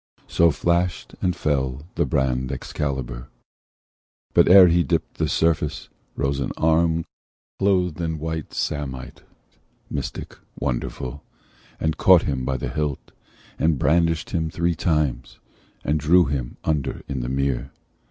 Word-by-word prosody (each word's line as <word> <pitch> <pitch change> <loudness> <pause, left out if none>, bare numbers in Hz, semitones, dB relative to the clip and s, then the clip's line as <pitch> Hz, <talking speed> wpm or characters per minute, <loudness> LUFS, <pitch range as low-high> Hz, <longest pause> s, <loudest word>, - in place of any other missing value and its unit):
So 85 0 +4
flashed 85 +3 0
and 90 -2 +1
fell 65 -3 -1
the - - 0
brand 65 -1 0
Excalibur: 65 -3 -4 1.1
But - - +5
ere 95 0 +10
he 85 0 +3
dipt 70 - -2
the - - +1
surface, 80 -1 0 0.3
rose 70 0 -1
an - - -2
arm 80 +1 +2 0.5
Clothed 90 -4 +1
in 80 -1 -2
white 80 0 -4
samite, 65 -3 -4 0.7
mystic, 70 -3 -5 0.2
wonderful, 65 +1 -3 0.6
And 80 -1 -1
caught 90 -3 +6
him 65 -3 -2
by 65 0 -1
the - - -4
hilt, 75 -3 -3 0.5
and 80 -1 +2
brandished 85 +3 +1
him 80 -4 -1
Three 85 +2 0
times, 75 -7 -1 0.5
and 75 - +1
drew 85 +5 +5
him 65 -3 -3
under 75 -4 -1
in 70 -2 -3
the - - -3
mere. 65 -1 -1
75 Hz, 135 wpm, -23 LUFS, 65-85 Hz, 1.1 s, ere